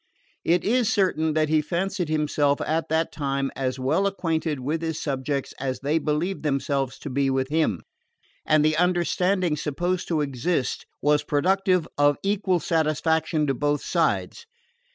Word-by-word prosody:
It 175 Hz, +1 st, +2 dB
is 235 Hz, 0 st, +2 dB
certain 160 Hz, -6 st, +1 dB
that 155 Hz, -1 st, +2 dB
he 155 Hz, -1 st, +3 dB
fancied 180 Hz, +2 st, -2 dB
himself, 150 Hz, -2 st, +1 dB
at 160 Hz, +1 st, -1 dB
that 160 Hz, +1 st, +1 dB
time, 140 Hz, -2 st, -2 dB
as 130 Hz, -1 st, -2 dB
well 135 Hz, +10 st, +1 dB
acquainted 165 Hz, -6 st, -1 dB
with 150 Hz, +6 st, -2 dB
his 160 Hz, -2 st, -3 dB
subjects 140 Hz, -1 st, -2 dB
as 130 Hz, -1 st, -3 dB
they 150 Hz, +4 st, +1 dB
believed 160 Hz, +5 st, -1 dB
themselves 140 Hz, -2 st, -1 dB
to -, -, -5 dB
be 135 Hz, +1 st, +1 dB
with 130 Hz, 0 st, 0 dB
him; 155 Hz, -, 0 dB, 0.6 s
and 155 Hz, -1 st, +3 dB
the 155 Hz, 0 st, +2 dB
understanding 180 Hz, 0 st, +1 dB
supposed 175 Hz, +5 st, -2 dB
to 160 Hz, -3 st, 0 dB
exist 140 Hz, +1 st, -2 dB, 0.2 s
was 150 Hz, 0 st, +3 dB
productive 185 Hz, +2 st, +1 dB
of 145 Hz, 0 st, +4 dB
equal 195 Hz, -2 st, +1 dB
satisfaction 160 Hz, 0 st, +1 dB
to 135 Hz, -, +1 dB
both 145 Hz, +3 st, 0 dB
sides. 465 Hz, -, -1 dB
155 Hz, 155 wpm, -25 LUFS, 145-175 Hz, 0.6 s, of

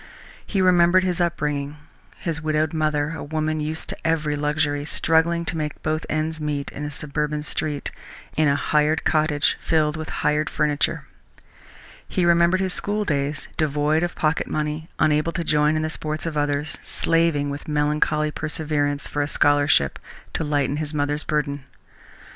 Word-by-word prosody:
He 195 Hz, -3 st, +1 dB
remembered 180 Hz, 0 st, +5 dB
his 180 Hz, -1 st, 0 dB
upbringing, 150 Hz, -4 st, -1 dB, 0.4 s
his 165 Hz, -2 st, -3 dB
widowed 155 Hz, 0 st, 0 dB
mother, 155 Hz, -1 st, 0 dB
a 165 Hz, -, -5 dB
woman 155 Hz, +1 st, -1 dB
used 155 Hz, +1 st, -3 dB
to -, -, -5 dB
every 155 Hz, -2 st, +1 dB
luxury, 145 Hz, 0 st, 0 dB
struggling 165 Hz, +2 st, +2 dB
to 165 Hz, -, -2 dB
make 150 Hz, -2 st, -4 dB
both 155 Hz, +1 st, -1 dB
ends 155 Hz, +1 st, -1 dB
meet 145 Hz, -2 st, -2 dB
in 145 Hz, -, -6 dB
a 150 Hz, -, -3 dB
suburban 150 Hz, +1 st, -2 dB
street, 150 Hz, -1 st, -3 dB, 0.4 s
in 155 Hz, 0 st, +3 dB
a 140 Hz, -, +3 dB
hired 150 Hz, +2 st, +1 dB
cottage 155 Hz, -2 st, +2 dB
filled 155 Hz, -2 st, +1 dB
with 155 Hz, 0 st, -5 dB, 0.2 s
hired 150 Hz, +1 st, +2 dB
furniture. 150 Hz, -2 st, 0 dB, 1.0 s
He 180 Hz, -, 0 dB
remembered 170 Hz, +2 st, +4 dB
his 190 Hz, -1 st, 0 dB
schooldays, 155 Hz, -10 st, -1 dB
devoid 150 Hz, +1 st, +1 dB
of 175 Hz, 0 st, -2 dB
pocket 155 Hz, 0 st, 0 dB
money, 155 Hz, +1 st, -3 dB
unable 155 Hz, +2 st, +2 dB
to 170 Hz, +1 st, -2 dB
join 150 Hz, -1 st, +3 dB
in 155 Hz, -, 0 dB
the 155 Hz, -, -1 dB
sports 155 Hz, +1 st, -4 dB
of 165 Hz, -2 st, -3 dB
others, 145 Hz, 0 st, -1 dB
slaving 165 Hz, -4 st, +1 dB
with 145 Hz, -, -7 dB
melancholy 150 Hz, 0 st, +1 dB
perseverance 150 Hz, -2 st, -1 dB
for 145 Hz, -, -2 dB
a 145 Hz, -, 0 dB
scholarship 145 Hz, -, +3 dB, 0.3 s
to -, -, -1 dB
lighten 145 Hz, -2 st, 0 dB
his 155 Hz, 0 st, -3 dB
mother's 145 Hz, +1 st, 0 dB
burden. 145 Hz, -2 st, -1 dB
150 Hz, 160 wpm, -23 LUFS, 145-160 Hz, 1.0 s, remembered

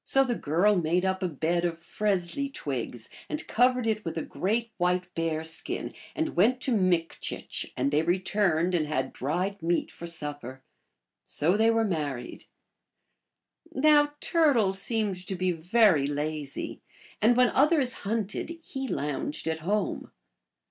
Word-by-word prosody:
the 270 Hz, -2 st, +4 dB
girl 185 Hz, +3 st, +2 dB
made 175 Hz, +1 st, +1 dB
up 190 Hz, 0 st, 0 dB
a 185 Hz, -, +1 dB
bed 170 Hz, +2 st, 0 dB
of 170 Hz, -2 st, -1 dB
fresli 200 Hz, +8 st, -1 dB
twigs 125 Hz, -, -4 dB, 0.2 s
and 305 Hz, -, -3 dB
covered 250 Hz, 0 st, +3 dB
it 215 Hz, -1 st, 0 dB
with 165 Hz, -1 st, -4 dB
a 160 Hz, -, -1 dB
great 225 Hz, +4 st, -1 dB
white 180 Hz, 0 st, 0 dB
bear 165 Hz, -1 st, -1 dB
skin, 160 Hz, 0 st, -4 dB, 0.2 s
and 320 Hz, 0 st, -2 dB
went 235 Hz, +8 st, +4 dB
to 260 Hz, -, -1 dB
Mikchich, 180 Hz, -4 st, -1 dB
and 135 Hz, +3 st, +1 dB
they 150 Hz, +1 st, +3 dB
returned 180 Hz, -1 st, +1 dB
and 160 Hz, -4 st, +1 dB
had 130 Hz, -3 st, -2 dB
dried 180 Hz, +8 st, -2 dB
meat 170 Hz, +1 st, 0 dB
for 170 Hz, -, -8 dB
supper. 145 Hz, -5 st, -5 dB, 0.6 s
So 165 Hz, +6 st, +1 dB
they 220 Hz, +2 st, +4 dB
were 225 Hz, 0 st, +3 dB
married. 145 Hz, -, -3 dB, 1.3 s
Now 295 Hz, 0 st, +4 dB
Turtle 270 Hz, -, +3 dB
seemed 200 Hz, -2 st, -1 dB
to 190 Hz, -, -2 dB
be 185 Hz, 0 st, +1 dB
very 175 Hz, -3 st, +3 dB
lazy, 145 Hz, 0 st, -3 dB, 0.4 s
and 235 Hz, +3 st, +4 dB
when 250 Hz, -1 st, +5 dB
others 280 Hz, -3 st, +3 dB
hunted 220 Hz, -, -2 dB
he 270 Hz, -3 st, -5 dB
lounged 150 Hz, -, -3 dB
at 160 Hz, 0 st, -1 dB
home. 200 Hz, +6 st, -1 dB
185 Hz, 145 wpm, -28 LUFS, 160-225 Hz, 1.3 s, when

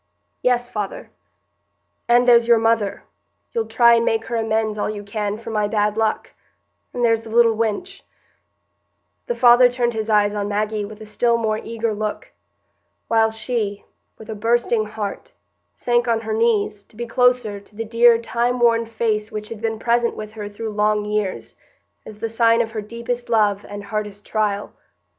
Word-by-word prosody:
"Yes, 245 Hz, -1 st, +1 dB
father." 210 Hz, -4 st, -5 dB, 1.0 s
"And 240 Hz, +1 st, +4 dB
there's 235 Hz, -1 st, +6 dB
your 235 Hz, -1 st, +6 dB
mother—you'll 225 Hz, -, -3 dB
try 235 Hz, -1 st, +5 dB
and 230 Hz, 0 st, +3 dB
make 225 Hz, -1 st, 0 dB
her 235 Hz, -, -4 dB
amends, 220 Hz, -1 st, -1 dB
all -, -, -1 dB
you 210 Hz, -1 st, -5 dB
can, 205 Hz, 0 st, -3 dB
for 225 Hz, 0 st, -8 dB
my 210 Hz, -1 st, 0 dB
bad 210 Hz, -1 st, 0 dB
luck—and 225 Hz, +2 st, -4 dB
there's 225 Hz, -1 st, +2 dB
the 225 Hz, -, -11 dB
little 230 Hz, 0 st, +4 dB
wench——" 230 Hz, -, -3 dB, 1.3 s
The 485 Hz, -, -1 dB
father 245 Hz, 0 st, +6 dB
turned 240 Hz, -1 st, -1 dB
his 220 Hz, 0 st, -3 dB
eyes 210 Hz, -1 st, +3 dB
on 205 Hz, -1 st, -2 dB
Maggie 210 Hz, 0 st, -1 dB
with 215 Hz, +1 st, -11 dB
a -, -, -8 dB
still 235 Hz, +2 st, +1 dB
more 220 Hz, -2 st, -1 dB
eager 230 Hz, -1 st, -3 dB
look, 210 Hz, 0 st, -4 dB, 0.8 s
while 225 Hz, -1 st, +4 dB
she, 220 Hz, -2 st, -3 dB, 0.3 s
with 220 Hz, -, -12 dB
a -, -, -3 dB
bursting 225 Hz, 0 st, +1 dB
heart, 210 Hz, -2 st, -6 dB, 0.4 s
sank 240 Hz, 0 st, 0 dB
on 230 Hz, -1 st, +1 dB
her 220 Hz, -1 st, -4 dB
knees, 215 Hz, -2 st, +1 dB
to -, -, -23 dB
be 240 Hz, +2 st, -4 dB
closer 245 Hz, -3 st, +1 dB
to 205 Hz, +1 st, -21 dB
the 225 Hz, +1 st, -4 dB
dear, 230 Hz, +1 st, +5 dB
time 240 Hz, +1 st, -1 dB
worn 230 Hz, -1 st, +3 dB
face 220 Hz, -1 st, -2 dB
which 215 Hz, 0 st, -6 dB
had 225 Hz, -2 st, -8 dB
been 225 Hz, -1 st, -2 dB
present 235 Hz, +1 st, +1 dB
with 215 Hz, 0 st, -7 dB
her 210 Hz, -2 st, -6 dB
through 220 Hz, +2 st, -6 dB
long 210 Hz, 0 st, +1 dB
years, 210 Hz, -2 st, -3 dB, 0.5 s
as 215 Hz, -, -10 dB
the 225 Hz, +2 st, -3 dB
sign 230 Hz, +1 st, +3 dB
of 225 Hz, -1 st, -3 dB
her 220 Hz, -1 st, -4 dB
deepest 235 Hz, +3 st, -5 dB
love 210 Hz, -3 st, +2 dB
and 205 Hz, 0 st, -7 dB
hardest 210 Hz, -1 st, -5 dB
trial. 210 Hz, -2 st, -1 dB
225 Hz, 175 wpm, -21 LUFS, 210-235 Hz, 1.3 s, there's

